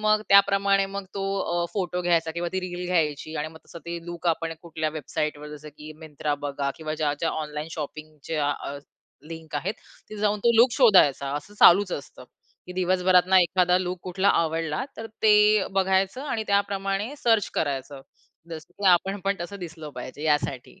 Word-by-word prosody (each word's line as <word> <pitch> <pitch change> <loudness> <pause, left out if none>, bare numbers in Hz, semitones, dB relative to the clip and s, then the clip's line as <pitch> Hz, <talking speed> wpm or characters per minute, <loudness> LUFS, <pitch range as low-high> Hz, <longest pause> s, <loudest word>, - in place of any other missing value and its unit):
मग 215 0 +3
त्या 200 0 +9
प्रमाणे 195 0 +2
मग 200 0 -6
तो 195 - -3 0.2
अ, 175 0 -1
फोटो 180 -3 -2
घ्यायचा, 165 -2 +1
किंवा 170 +2 -3
ती 190 - -1
रील 180 -1 -5
घ्यायची 155 -3 -1
आणि 150 +1 -2
मग 160 0 -14
तसं 170 - -10
ते 170 0 -4
लूक 175 0 -6
आपण 165 0 -1
कुठल्या 160 -2 -3
वेबसाईटवर 150 0 -4
जसं 150 +1 -12
की 150 +1 -11
Myntra 150 -1 -3
बघा 140 -1 -2
किंवा 155 -1 -4
ज्या-ज्या 150 +1 -1
ऑनलाईन 150 0 -5
शॉपिंगच्या 155 -1 -4
अ, 145 0 -5 0.5
लिंक 160 -1 -9
आहेत, 180 +8 -2 0.3
तिथे 215 - -8
जाऊन 210 0 +1
तो 235 - +5
लूक 240 +3 +6
शोधायचा, 185 - +4
असं 150 +8 -9
चालूच 185 +1 +6
असतं, 140 - -7 0.4
की 180 - -8
दिवसभरातनं 185 0 +3
एखादा 180 0 +3
लूक 180 0 -3
कुठला 190 +2 0
आवडला, 165 - -2
तर 225 - -6 0.2
ते 210 -1 +5
बघायचं 190 +4 +1
आणि 240 -7 -3
त्याप्रमाणे 200 +3 0
सर्च 225 -4 +3
करायचं, 140 -1 -3 0.5
जसं 160 -1 -9
की 200 - -3
आपण 190 +3 +2
पण 200 0 +1
तसं 200 +4 -6
दिसलं 165 -3 -8
पाहिजे, 130 +3 -8
यासाठी. 150 +1 -1
175 Hz, 175 wpm, -25 LUFS, 155-195 Hz, 0.5 s, त्या